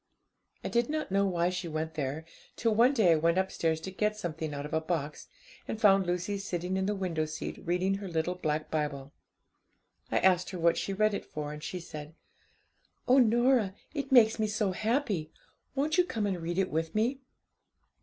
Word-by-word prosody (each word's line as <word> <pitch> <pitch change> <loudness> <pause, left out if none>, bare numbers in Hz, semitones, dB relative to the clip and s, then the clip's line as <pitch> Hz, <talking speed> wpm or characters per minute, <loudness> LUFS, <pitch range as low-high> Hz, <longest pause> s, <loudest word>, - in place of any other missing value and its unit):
I - - -2
did 235 +2 +1
not 305 -8 -2
know 200 +1 +3
why 175 -1 +1
she 180 -1 -4
went 160 0 -3
there, 150 +1 -3 0.3
till 225 -1 +1
one 235 +4 +5
day 205 -8 +5
I 165 - +5
went 165 +3 +2
upstairs 165 -4 0
to 190 - -6
get 210 +2 0
something 160 -5 -4
out 145 0 -5
of 150 - -8
a 160 - +2
box, 160 -3 -3 0.4
and 220 - -4
found 195 -4 +5
Lucy 180 +3 -1
sitting 180 -1 -3
in 190 0 0
the 210 - 0
window 175 -5 -1
seat 155 0 -6
reading 180 +3 +1
her 200 - -6
little 165 0 -1
black 155 -3 -2
Bible. 145 -3 -3 1.0
I - - +2
asked 185 -1 +3
her 185 - -5
what 170 0 +3
she - - -2
read 215 +2 +2
it - - -3
for, 150 -1 -5
and 150 - -8
she 180 - -4
said 155 -2 -9 0.9
'"Oh, 255 +2 +6
Norah, 240 -3 +3 0.2
it 280 -3 -4
makes 225 -4 +6
me 215 - +2
so 210 -2 0
happy! 215 - -1 0.5
won't 300 +5 +1
you - - +7
come 230 -11 -2
and 190 -4 -2
read 170 +2 -3
it 190 -1 +1
with 160 +3 -2
me?" 240 +5 +1
185 Hz, 200 wpm, -30 LUFS, 160-215 Hz, 1.0 s, you